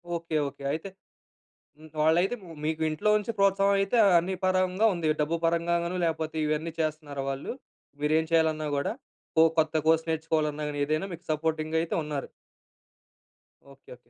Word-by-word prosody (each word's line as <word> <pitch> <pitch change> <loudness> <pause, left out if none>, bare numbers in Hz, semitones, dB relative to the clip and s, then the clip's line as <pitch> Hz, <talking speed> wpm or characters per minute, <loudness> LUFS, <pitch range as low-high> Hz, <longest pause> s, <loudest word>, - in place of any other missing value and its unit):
Okay 165 -2 -2
okay. 140 - -10
అయితే 160 +5 -4 1.1
వాళ్ళైతే 170 +7 +3 0.3
మీకు 160 +1 -1
ఇంట్లో 155 +7 0
నుంచి 210 +2 -2
ప్రోత్సాహం 195 0 +3
అయితే 195 +4 +1 0.2
అన్ని 180 +3 -1
పరంగా 185 +3 +2
ఉంది. 170 -3 -1
డబ్బు 155 +3 +1
పరంగా 170 +1 +2
గాను 175 +2 -3
లేకపోతే 160 -1 -2
ఇవన్నీ 155 +2 -1
చేస్తున్నారా 150 -3 -3
వాళ్ళు? 135 +1 -4 0.5
మీరేం 155 +2 +2
చేయాలన్నా 160 -2 +2
కూడా? 140 - -1 0.4
కొ 160 - +7 0.2
కొత్త 155 0 +2
కోర్స్ 160 0 +3
నేర్చుకోవాలన్నా 155 -2 -1
గాని 145 -1 -4
ఏదైనా 155 +5 -1
మీకు 170 +2 -9
సపోర్టింగ్ 155 0 -1
అయితే 165 - -2
ఉన్నారు. 150 -2 -4 1.4
ఓకే. 135 0 -18
ఓకే. - - -11
160 Hz, 145 wpm, -27 LUFS, 155-170 Hz, 1.4 s, కొ